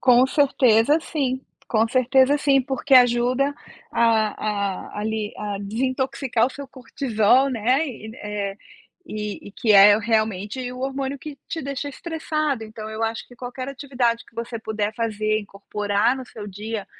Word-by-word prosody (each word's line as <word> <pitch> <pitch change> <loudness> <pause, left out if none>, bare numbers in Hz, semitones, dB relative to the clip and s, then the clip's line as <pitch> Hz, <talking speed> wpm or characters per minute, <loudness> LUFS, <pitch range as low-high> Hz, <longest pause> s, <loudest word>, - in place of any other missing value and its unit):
Com 250 0 +6
certeza, 270 -1 +4
sim. 265 -5 -2 0.3
Com 225 0 +3
certeza, 260 +3 +3
sim, 275 -2 +3
porque 265 +1 +1
ajuda 250 +3 +4 0.4
a 215 -3 0
a - - -3
ali 215 -1 -2
a 205 -1 -4
desintoxicar 255 +2 0
o - - -5
seu 280 +1 -8
cortisol, 260 -1 +1
né, 255 +6 +1
e 220 -4 -8
eh, 205 -1 -4 0.5
e 210 -1 -5
e - - -14
que 215 -1 +2
é 205 +1 +8
realmente 220 +2 -1
o 250 - -8
hormônio 270 +1 -3
que 290 0 -8
te 325 - -3
deixa 280 +1 -4
estressado, 310 -6 -2
então 215 0 -8
eu 220 +1 -4
acho 225 0 -2
que 245 - -16
qualquer 255 +1 -6
atividade 250 -4 -1
que - - -23
você 230 0 -5
puder 215 -1 -3
fazer, 215 -1 0
incorporar 205 +3 -1
no 260 - -7
seu 210 -2 -9
dia, 210 +1 -5
235 Hz, 155 wpm, -23 LUFS, 215-265 Hz, 0.5 s, é